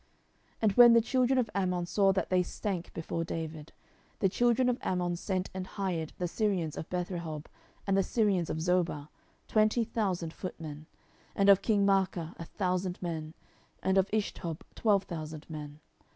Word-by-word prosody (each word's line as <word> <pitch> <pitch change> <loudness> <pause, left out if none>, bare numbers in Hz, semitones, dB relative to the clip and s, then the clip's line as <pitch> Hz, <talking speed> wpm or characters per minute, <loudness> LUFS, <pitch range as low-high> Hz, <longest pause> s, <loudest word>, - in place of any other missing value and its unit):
10:010:006 - - -37
And 215 - +5
when 240 +2 +8
the 230 - +6
children 255 +2 +2
of 240 -4 +1
Ammon 180 -3 0
saw 195 +2 +3
that 190 -2 -1
they 185 0 +4
stank 180 -1 -4
before 165 0 -3
David, 160 -2 -5 0.5
the 195 - +2
children 240 +4 +2
of 250 0 +1
Ammon 180 -1 0
sent 185 +1 -2
and 185 0 -5
hired 175 -5 -3
the 180 - -1
Syrians 180 -5 -1
of 160 - -6
Bethrehob 170 -4 -4 0.4
and 195 - +2
the 195 - +4
Syrians 195 -4 +1
of - - -2
Zoba, 170 -3 0 0.4
twenty 215 +2 +3
thousand 190 -8 -2
footmen, 155 -4 -7 0.5
and 200 0 +4
of 195 -1 +7
king 205 -3 +2
Maacah 190 -4 +1
a 165 - -5
thousand 180 0 -2
men, 160 -2 -4 0.5
and 190 - +2
of 190 0 +3
Ishtob 185 -6 -2
twelve 205 -3 +2
thousand 155 -4 -7
men. 150 -1 -7
185 Hz, 165 wpm, -30 LUFS, 165-200 Hz, 0.5 s, when